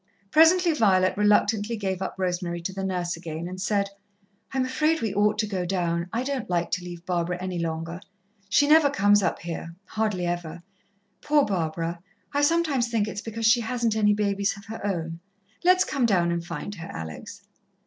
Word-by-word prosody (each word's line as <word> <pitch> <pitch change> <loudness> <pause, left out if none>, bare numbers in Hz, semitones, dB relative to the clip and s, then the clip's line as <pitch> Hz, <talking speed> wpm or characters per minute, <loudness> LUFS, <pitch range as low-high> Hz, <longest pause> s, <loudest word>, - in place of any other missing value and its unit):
Presently 335 +2 +5
Violet 185 -8 +3
reluctantly 210 +2 +2
gave 190 -3 -2
up 190 - -3
Rosemary 180 -2 -2
to 190 - -3
the 195 0 -4
nurse 180 -2 -2
again, 165 0 -6
and 185 +1 -7
said: 200 -1 0 0.6
"I'm 265 -1 0
afraid 305 +5 +1
we 220 -7 -2
ought 210 +1 +2
to 215 - +1
go 195 -3 -2
down. 170 -2 -1
I 235 +2 -1
don't 265 -5 -3
like 175 -1 0
to 180 - -1
leave 175 -1 -9
Barbara 180 -1 -1
any 185 -1 -3
longer. 165 +1 -4 0.5
She 285 +7 +4
never 305 -1 +6
comes 205 -5 +4
up - - 0
here 165 0 -6
hardly 210 -5 -1
ever. 175 -1 -4 0.6
Poor 295 -1 +3
Barbara! 170 -2 -2 0.3
I 285 - +2
sometimes 290 -5 +2
think 225 -3 0
it's 205 0 -5
because 225 0 -4
she 235 +2 +5
hasn't 230 -1 -1
any 210 -1 +3
babies 200 -1 0
of 200 - -13
her 225 -1 -8
own. 165 -4 -3 0.4
Let's 365 +1 +5
come 270 -5 0
down 175 -5 +2
and 170 0 -2
find 170 +4 -6
her, 170 -4 -8
Alex." 80 -2 -8
200 Hz, 185 wpm, -26 LUFS, 175-230 Hz, 0.6 s, never